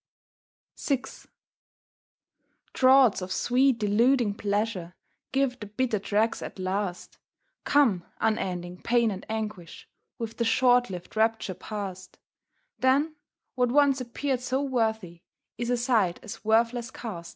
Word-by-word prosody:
VI 270 -3 0 1.7
Draughts 260 -5 +5
of 185 0 -6
sweet 255 +4 +2
deluding 225 +2 +2
pleasure 200 -4 -2 0.4
Give 265 -2 0
the 210 - -7
bitter 215 +1 -1
dregs 215 +3 0
at - - -7
last; 185 0 -3 0.5
Come, 230 -12 +3
unending 180 -5 -2
pain 235 -2 +2
and 190 -1 -6
anguish, 210 -5 -5 0.3
With 225 -1 -6
the 235 - +1
short 245 +1 +3
lived 180 +1 -8
rapture 220 -3 +1
past; 190 -2 -7 0.6
Then, 280 +5 +2 0.4
what 250 -1 +1
once 280 -1 +4
appeared 255 +1 -2
so 260 +2 -1
worthy, 220 -10 -1 0.4
Is 240 0 -2
aside 235 -7 +1
as 220 -1 -9
worthless 230 +2 +2
cast. 180 -10 -7
225 Hz, 120 wpm, -27 LUFS, 200-250 Hz, 1.7 s, Draughts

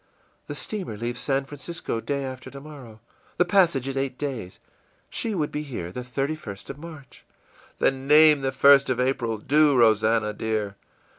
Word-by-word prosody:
î - - -18
ìThe - - -4
steamer 190 - -5
leaves 120 +2 -4
San 135 -1 0
Francisco 145 -3 -5
day 140 +2 -2
after 130 0 -7
tomorrow. 140 -5 -11 0.4
The 180 - +4
passage 175 -8 +3
is 135 - -3
eight 135 -1 -2
days. 130 -11 -5 0.5
She 225 -3 -1
would 150 -4 -1
be 150 - -3
here 120 - -6
the 125 - -5
31st 135 -4 -4
of 135 - -12
March.î 155 -4 -12 0.6
ìThen 135 0 +1
name 150 0 +7
the 135 - 0
1st 140 +1 +5
of 125 -1 0
April; 125 -3 0
do, 145 +5 +3
Rosannah, 110 -1 +3
dear. 105 -2 -2
135 Hz, 165 wpm, -25 LUFS, 115-150 Hz, 0.6 s, name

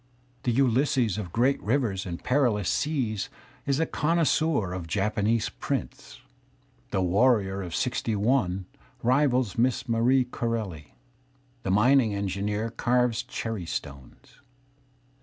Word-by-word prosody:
The 120 - 0
Ulysses 125 -3 +2
of 90 -5 -6
great 125 +7 +2
rivers 105 -6 0
and 85 -1 -6
perilous 120 -7 +1
seas 120 -10 -1 0.4
is 140 +1 +1
a 165 - +2
connoisseur 155 - +1
of 90 -2 -5
Japanese 105 +5 0
prints. - - -5 0.7
The 95 - 0
warrior 100 0 +2
of 85 -3 -5
'Sixty 120 -3 -1
one 100 -4 +1 0.4
rivals 125 -4 +2
Miss 125 +1 +1
Marie 125 +3 +3
Corelli. 110 -11 -4 0.7
The 95 - -4
mining 110 +2 +4
engineer 100 +3 -2
carves 125 -1 +1
cherry 110 -7 -5
stones. 70 -5 -8
115 Hz, 115 wpm, -27 LUFS, 100-130 Hz, 0.7 s, mining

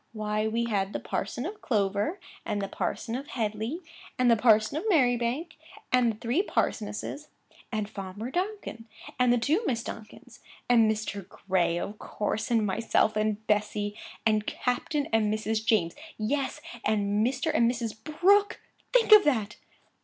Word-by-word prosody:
Why, 215 0 -1
we 230 +2 0
had 200 -3 -1
the - - -2
parson 240 +6 -3
of 415 +4 -6
Clover, 205 - 0 0.2
and 205 - -2
the 195 - -2
parson 225 - -3
of 270 +4 -4
Headleigh, 225 - -3 0.3
and 250 -1 +4
the - - +6
parson 220 +2 +4
of 435 +8 -2
Merribank, 255 - +2 0.4
and 250 -2 +4
the - - -14
three 240 +10 +1
parsonesses; 230 - -2 0.4
and 215 -3 -1
Farmer 205 +4 -6
Donkin, 365 - -4 0.3
and 245 -1 +3
two 315 - +2
Miss 230 -3 0
Donkins; 220 -1 -10 0.3
and 230 -3 +5
Mr. 205 -3 -4
Gray 175 -3 0
(of 205 +4 -5
course), 215 +1 -3
and 225 -3 +2
myself 215 +1 +1
and 215 0 -1
Bessy; 210 0 0 0.3
and 215 -1 +2
Captain 280 +4 -1
and 215 -2 +3
Mrs. 215 0 -1
James; 195 -7 +2 0.2
yes, 265 +6 -1 0.2
and 205 0 +1
Mr. 270 +6 0
and 235 0 +4
Mrs. 235 -2 -3
Brooke; 400 - +3 0.3
think 480 -3 +3
of 425 -1 +10
that! 220 -8 0
225 Hz, 155 wpm, -28 LUFS, 210-255 Hz, 0.4 s, of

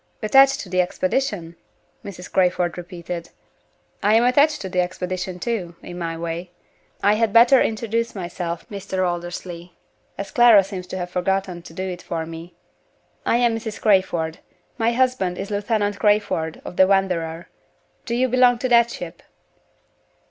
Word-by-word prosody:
"Attached 270 +5 +5
to - - -9
the 185 0 +2
expedition?" 185 -1 -2 0.5
Mrs. 185 -2 -9
Crayford 180 -2 +1
repeated. 175 -1 -7 0.7
"I 210 +2 +4
am 230 - +5
attached 285 +5 +3
to 190 - -4
the 180 -1 -1
expedition 180 0 -4
too 185 -6 -3
in 175 - -8
my 165 -1 -3
way. 170 +2 -5 0.5
I 205 - +5
had 220 0 +1
better 235 +4 +6
introduce 230 +1 -1
myself, 175 -2 -5
Mr. 190 -3 -2
Aldersley, 175 0 -6 0.4
as 200 0 -6
Clara 235 -5 +7
seems 185 -1 -7
to - - -5
have 180 -1 -5
forgotten 185 -1 -1
to 165 - -13
do 185 - -4
it 180 -1 -6
for 165 -1 -4
me. 165 +1 -10 0.7
I - - +3
am 240 -1 +2
Mrs. 225 -1 -6
Crayford. 180 -6 +1 0.4
My 230 +1 +2
husband 240 -8 +1
is 195 +2 -5
Lieutenant 205 0 -1
Crayford, 205 -6 +1
of - - -8
the 190 - +6
Wanderer. 175 -4 0 0.6
Do 235 - -1
you 255 +2 +2
belong 250 -1 +4
to 255 +2 -2
that 235 -1 +5
ship?" 175 -7 -8
190 Hz, 155 wpm, -22 LUFS, 175-225 Hz, 0.7 s, Clara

